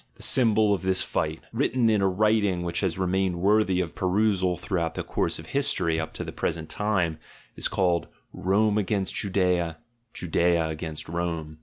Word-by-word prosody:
The - - -9
symbol 110 -4 +4
of 100 - -1
this 95 0 +2
fight, 80 0 -2
written 125 -1 +1
in 110 -2 +3
a 95 - +3
writing 100 -2 +2
which 85 -1 -2
has 90 -4 -1
remained 95 -1 0
worthy 100 -1 +3
of 85 -4 -4
perusal 95 -1 +1
throughout 85 -3 -2
the - - -3
course - - -1
of - - -10
history 135 -13 +1
up 80 - -4
to - - -5
the - - -6
present 80 -1 -3
time, 95 -7 0 0.4
is - - -1
called 90 -3 +1 0.3
"Rome 105 +3 +2
against 100 -1 -1
Judaea, 90 -4 0 0.3
Judaea 85 -1 +1
against 80 0 -5
Rome." 80 -2 -4
95 Hz, 170 wpm, -26 LUFS, 85-105 Hz, 0.4 s, symbol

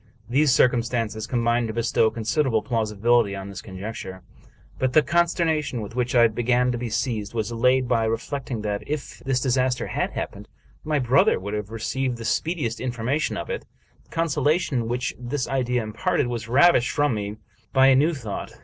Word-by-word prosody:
These 140 +4 +3
circumstances 115 -3 +1
com 120 -1 -1
bined 120 0 +2
to 110 - -4
bestow 115 -1 +2
considerable 115 +1 0
plausibility 115 -2 +1
on 95 0 -7
this 95 -1 -7
conjecture; 95 -2 -7 0.6
but 130 -1 0
the 155 - +6
consternation 165 -6 +1
with 105 +1 -7
which 125 0 -1
I 120 -1 +7
began 120 +3 +1
to 120 - -2
be 120 -1 -3
seized 110 -1 -2
was 110 0 -1
allayed 125 +2 +2
by 115 -1 +2
reflecting 115 +1 -3
that, 105 -1 -2
if 150 -1 -5
this 130 -1 0
disaster 130 0 +1
had - - -2
happened, - - -5 0.4
my 155 -1 0
brother 130 +1 +3
would 100 +3 -5
have 105 -1 -3
received 125 +3 -2
the 115 - -7
speediest 145 -4 -1
information 125 +4 -1
of - - -5
it. - - -5 0.4
The - - -33
consolation 150 -5 0
which 125 +1 -2
this 125 +2 -3
idea 125 -2 0
imparted 110 +3 0
was 120 -2 -4
ravished 130 +1 +5
from 145 -3 +1
me 105 -1 -3 0.4
b) 130 - 0
a 135 0 +7
new 155 +5 +3
thought. 115 -7 -6
120 Hz, 175 wpm, -24 LUFS, 110-135 Hz, 0.6 s, I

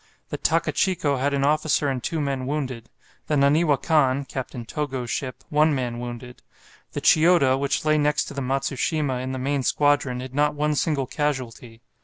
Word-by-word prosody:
The - - -4
"Takachico" 160 -7 +1
had 140 +2 +1
an 140 -1 0
officer 150 0 +2
and 130 -2 -2
two 165 +5 -2
men 135 -3 -2
wounded; 130 -5 -4 0.4
the 150 - +1
"Naniwa 145 +1 +3
Kan" 140 -4 +2
(Captain 130 -2 -6
Togo's 130 -2 -4
ship) 130 -3 -4
one 150 0 +3
man 120 -2 -3
wounded. 120 +1 -8 0.5
The - - -3
"Chiyoda," 160 -5 +5
which 140 +2 -1
lay 155 0 +3
next 150 0 +1
to - - -8
the 140 - -4
"Matsushima," 135 +1 -1
in 130 0 -4
the 130 - -3
main 140 +2 -1
squadron, 140 -2 +1
had 130 0 -7
not 150 +1 +1
one 150 +1 0
single 145 -2 0
casualty. 125 -5 -4
140 Hz, 175 wpm, -24 LUFS, 130-150 Hz, 0.5 s, Chiyoda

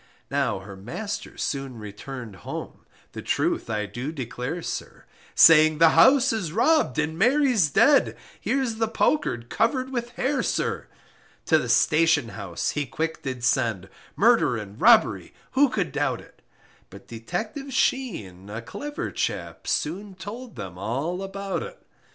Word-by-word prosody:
Now - - 0
her 100 0 -10
master 175 - -6
soon 135 -3 -3
returned 110 +1 -8
home, - - -8 0.2
The - - -7
truth - - -1
I 105 -1 -1
do 120 +9 -5
declare, 130 +3 -5
sir, - - -6 0.3
Saying 155 -1 +7
the 165 0 +7
house 260 - +5
is 185 -8 -2
rob'd 235 - +2
and 160 +2 -1
Mary's 250 - +3
dead, 280 - +4 0.2
Here's 260 -5 -1
the 225 0 +1
poker 225 - +1
cover'd 235 - -1
with 240 -2 -3
hair, 265 +1 0
sir - - -2 0.6
To 160 - +4
the 125 - -4
station 155 +2 +3
house 100 -6 -3
he 145 -2 -2
quick 160 +5 -3
did 130 -3 -5
send, 115 -6 0 0.3
Murder 195 - +4
and 105 0 -9
robbery, 230 -1 +4 0.2
who 280 +1 +4
could 190 - -2
doubt - - -1
it, - - -18 0.5
But - - -14
Detective 215 - -5
Sheen, 110 - -1
a 110 +3 -6
clever 290 - -5
chap, - - -4
Soon 190 +5 -2
told 220 - -8
them 95 -5 -8
all 140 - -2
about 195 0 -4
it. - - -8
160 Hz, 145 wpm, -25 LUFS, -, 0.6 s, Saying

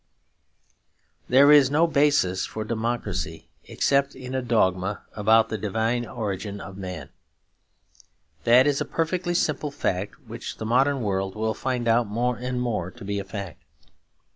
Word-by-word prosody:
There 140 +3 +7
is 145 -3 +7
no 155 +4 +3
basis 145 - +2
for 110 - -5
democracy 110 -7 -3 0.2
except 140 0 +1
in 130 0 -8
a 130 - 0
dogma 100 -5 0
about 110 +2 +4
the 110 - -3
divine 110 +4 -1
origin 100 -3 -4
of 95 -1 -9
man. 90 -6 -7 1.3
That 125 +6 +6
is 145 -1 +1
a - - 0
perfectly 175 +2 -1
simple 150 -3 0
fact 100 -8 -3
which - - -7
the 110 - -5
modern 135 +4 +2
world 95 -2 -2
will 110 +1 -1
find 125 +1 -2
out 115 0 +3
more 120 +4 0
and 125 +1 -3
more 110 -8 -2
to 115 +2 -12
be 100 0 -2
a - - -4
fact. 100 -5 -7
115 Hz, 150 wpm, -25 LUFS, 100-130 Hz, 1.3 s, There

